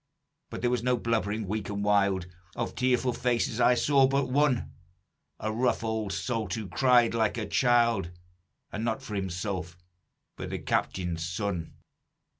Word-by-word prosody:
But - - -6
there 120 0 +1
was 125 -2 0
no 125 0 +1
blubbering 110 -2 -1
weak 105 +1 -3
and 100 0 -3
wild, 100 -3 +2 0.3
Of - - -3
tearful 125 0 +1
faces 120 -1 0
I 125 - +5
saw 135 +1 +4
but 135 -1 0
one, 140 -3 +2 0.7
A 110 - -2
rough 120 +1 0
old 110 -2 -2
salt, 115 +2 -2
who 110 -3 -5
cried 120 +4 +4
like 110 0 +1
a 110 - -2
child, 115 -4 +2 0.6
And 105 - -4
not 115 -1 -1
for 105 - -7
himself, 90 -2 -3 0.6
but - - -5
the - - -3
captain's 90 -3 -1
son. 90 -1 -3
110 Hz, 155 wpm, -28 LUFS, 100-125 Hz, 0.7 s, I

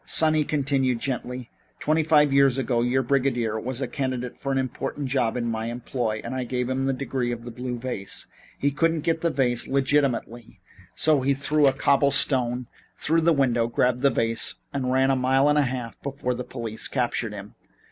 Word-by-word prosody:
"Son," 155 -1 +3
he 155 -1 +2
continued 135 -4 0
gently, 125 -1 -4 0.3
"twenty 155 +1 +1
five 150 -2 +4
years 135 -2 +4
ago 125 -3 0
your 125 +2 +1
brigadier 120 -4 0
was 130 +3 -4
a - - -2
candidate 130 -2 -3
for 135 - -4
an 135 - 0
important 135 +2 -3
job 125 -3 0
in 120 - -2
my 115 -1 -2
employ 120 -2 -3
and 120 - -5
I 130 -1 -2
gave 125 +1 -2
him 135 +1 -1
the - - +2
Degree 130 -2 -2
of 120 0 -6
the 120 - -6
Blue 125 +1 -5
Vase. 120 -5 -4 0.3
He 140 - +1
couldn't 165 +2 +1
get 165 0 0
the 170 - +2
vase 125 -5 +1
legitimately, 135 -4 0 0.4
so 155 -3 +3
he 140 +1 +1
threw 145 +1 +2
a - - +5
cobble 140 +1 +3
stone 125 -3 +2 0.3
through 165 +2 +1
the 170 +1 +4
window, 125 -6 +2
grabbed 125 +1 +1
the 140 - +5
vase 115 -2 0 0.2
and 130 -2 -1
ran 130 +1 +3
a - - +2
mile 130 +2 +3
and 150 0 +4
a 140 -4 +2
half 125 -3 -6
before 135 -2 -3
the 125 +1 -5
police 115 -3 -5
captured 120 -4 -1
him. 100 0 -9
130 Hz, 200 wpm, -25 LUFS, 120-140 Hz, 0.4 s, a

